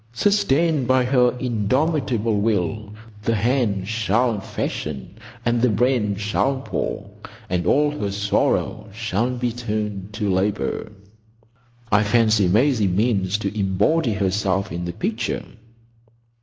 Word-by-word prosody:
Sustained 160 Hz, -, +2 dB
by 130 Hz, 0 st, +3 dB
her 125 Hz, -1 st, +3 dB
indomitable 120 Hz, -1 st, 0 dB
will, 105 Hz, 0 st, -1 dB, 0.3 s
The 115 Hz, +2 st, 0 dB
hands 110 Hz, -4 st, 0 dB
shall 115 Hz, +1 st, +1 dB
fashion, 75 Hz, -, -5 dB, 0.3 s
and 120 Hz, 0 st, +2 dB
the 125 Hz, -, +4 dB
brain 110 Hz, -2 st, +1 dB
shall 110 Hz, +7 st, 0 dB
pore, -, -, -3 dB, 0.4 s
And 90 Hz, -1 st, 0 dB
all 150 Hz, +1 st, +3 dB
her 105 Hz, -9 st, -3 dB
sorrow 100 Hz, +1 st, 0 dB
shall 110 Hz, +1 st, -1 dB
be 120 Hz, -1 st, -1 dB
turned 105 Hz, -4 st, -4 dB
to 105 Hz, -1 st, -2 dB
labour—— 100 Hz, +2 st, -1 dB, 1.0 s
I 105 Hz, 0 st, +5 dB
fancy 110 Hz, -2 st, +3 dB
Maisie 110 Hz, +2 st, +3 dB
means 100 Hz, 0 st, +1 dB
to 105 Hz, -1 st, -4 dB
embody 105 Hz, -, +1 dB
herself 100 Hz, -1 st, 0 dB
in 85 Hz, +2 st, -4 dB
the 85 Hz, -, -4 dB
picture." -, -, -2 dB
110 Hz, 120 wpm, -22 LUFS, 100-125 Hz, 1.0 s, I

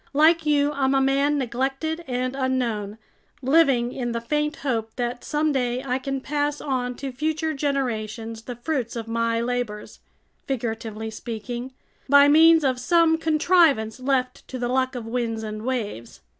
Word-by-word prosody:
Like 315 Hz, +2 st, +4 dB
you, 290 Hz, -1 st, +3 dB
I'm 275 Hz, -2 st, +1 dB
a -, -, +4 dB
man 275 Hz, +2 st, +2 dB
neglected 270 Hz, +6 st, -2 dB
and 255 Hz, +1 st, -2 dB
unknown, 240 Hz, -6 st, -1 dB, 0.5 s
living 265 Hz, -4 st, +3 dB
in 240 Hz, -2 st, -3 dB
the 235 Hz, -, -1 dB
faint 300 Hz, +5 st, -1 dB
hope 225 Hz, -4 st, -1 dB
that 245 Hz, 0 st, -3 dB
someday 265 Hz, -5 st, 0 dB
I 255 Hz, 0 st, 0 dB
can 270 Hz, 0 st, -3 dB
pass 290 Hz, +1 st, -1 dB
on 250 Hz, -3 st, -2 dB
to 270 Hz, +1 st, -5 dB
future 310 Hz, +4 st, -1 dB
generations 230 Hz, -6 st, -2 dB
the 245 Hz, +1 st, -7 dB
fruits 245 Hz, -1 st, -3 dB
of 225 Hz, -1 st, -5 dB
my 230 Hz, 0 st, 0 dB
labors—figuratively 225 Hz, -1 st, -5 dB
speaking, 240 Hz, +3 st, -6 dB, 0.4 s
by 285 Hz, +1 st, +7 dB
means 320 Hz, +1 st, +6 dB
of 260 Hz, -2 st, +1 dB
some 325 Hz, +3 st, +3 dB
contrivance 315 Hz, -8 st, +3 dB
left 255 Hz, -1 st, -1 dB
to 260 Hz, -, -6 dB
the 245 Hz, -1 st, -2 dB
luck 260 Hz, +1 st, 0 dB
of 240 Hz, -2 st, -5 dB
winds 225 Hz, -1 st, -2 dB
and 215 Hz, 0 st, -5 dB
waves. 220 Hz, -, -4 dB
255 Hz, 150 wpm, -24 LUFS, 235-285 Hz, 0.5 s, by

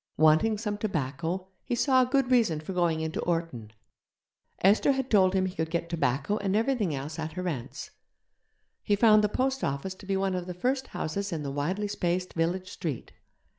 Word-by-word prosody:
Wanting 160 Hz, +8 st, +4 dB
some 205 Hz, -1 st, -3 dB
tobacco, 170 Hz, 0 st, -2 dB
he 245 Hz, -, -2 dB
saw 260 Hz, +1 st, +4 dB
a -, -, +4 dB
good 265 Hz, -1 st, +1 dB
reason 225 Hz, -11 st, +3 dB
for 155 Hz, +5 st, -6 dB
going 170 Hz, -3 st, +1 dB
into 160 Hz, +6 st, -3 dB
Orton. 165 Hz, -11 st, -2 dB, 0.9 s
Esther 205 Hz, +8 st, +5 dB
had 265 Hz, -1 st, -3 dB
told 190 Hz, -3 st, +4 dB
him 190 Hz, 0 st, +2 dB
he 185 Hz, -, -3 dB
could 160 Hz, -2 st, -2 dB
get 170 Hz, 0 st, -2 dB
tobacco 145 Hz, +3 st, 0 dB
and 195 Hz, -1 st, -1 dB
everything 220 Hz, -, +1 dB
else 150 Hz, +4 st, -6 dB
at 160 Hz, 0 st, -4 dB
her 180 Hz, 0 st, -4 dB
aunt's. 135 Hz, -3 st, -5 dB, 0.9 s
He 205 Hz, -, +1 dB
found 215 Hz, 0 st, +5 dB
the 210 Hz, -, +2 dB
post 265 Hz, +3 st, -1 dB
office 140 Hz, +7 st, -2 dB
to 190 Hz, +1 st, -14 dB
be 195 Hz, -1 st, +1 dB
one 190 Hz, 0 st, 0 dB
of 180 Hz, -1 st, -3 dB
the 180 Hz, -, -5 dB
first 260 Hz, +8 st, -1 dB
houses 200 Hz, +5 st, -3 dB
in 160 Hz, -3 st, -3 dB
the 140 Hz, -, -3 dB
widely 180 Hz, +9 st, -1 dB
spaced 180 Hz, -2 st, -2 dB
village 180 Hz, +3 st, -1 dB
street. 155 Hz, -9 st, -5 dB
185 Hz, 195 wpm, -28 LUFS, 160-210 Hz, 0.9 s, Esther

